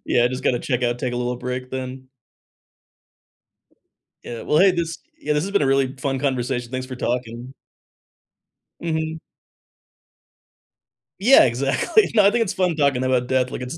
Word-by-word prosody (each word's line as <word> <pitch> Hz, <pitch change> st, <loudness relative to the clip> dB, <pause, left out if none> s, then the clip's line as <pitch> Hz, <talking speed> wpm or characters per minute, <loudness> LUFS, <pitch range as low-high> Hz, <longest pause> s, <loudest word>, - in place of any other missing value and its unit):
Yeah, 120 Hz, -, +3 dB
"I 120 Hz, -, +3 dB
just 130 Hz, +1 st, -5 dB
gotta 120 Hz, -, +2 dB
check 125 Hz, -1 st, -2 dB
out, 120 Hz, 0 st, 0 dB
take 125 Hz, 0 st, -3 dB
a -, -, -3 dB
little 125 Hz, 0 st, -2 dB
break 125 Hz, +1 st, -5 dB
then." 130 Hz, 0 st, -6 dB, 2.2 s
Yeah, 120 Hz, -1 st, -7 dB
well, 150 Hz, -, +1 dB
hey, 190 Hz, 0 st, +6 dB
this 170 Hz, -2 st, -3 dB, 0.2 s
Yeah, 150 Hz, -, -1 dB
this 150 Hz, +1 st, 0 dB
has 195 Hz, -, -4 dB
been 200 Hz, -, +2 dB
a 140 Hz, -, +2 dB
really 135 Hz, 0 st, +1 dB
fun 135 Hz, -1 st, -2 dB
conversation, 125 Hz, -3 st, -2 dB
thanks 130 Hz, 0 st, -4 dB
for 130 Hz, -, -7 dB
talking. 120 Hz, +1 st, -4 dB, 1.3 s
Mhm. 160 Hz, -1 st, -2 dB, 2.0 s
Yeah, 235 Hz, -, +7 dB
exactly. 135 Hz, -, +1 dB
No, 210 Hz, -3 st, +5 dB
I 200 Hz, -, +6 dB
think 235 Hz, -1 st, +2 dB
it's 200 Hz, -2 st, -3 dB
fun 180 Hz, -3 st, 0 dB
talking 140 Hz, -4 st, +1 dB
about 130 Hz, -1 st, +1 dB
death, 130 Hz, -1 st, +1 dB
like, -, -, -6 dB
it's 125 Hz, +6 st, -6 dB
130 Hz, 170 wpm, -22 LUFS, 125-160 Hz, 2.2 s, Yeah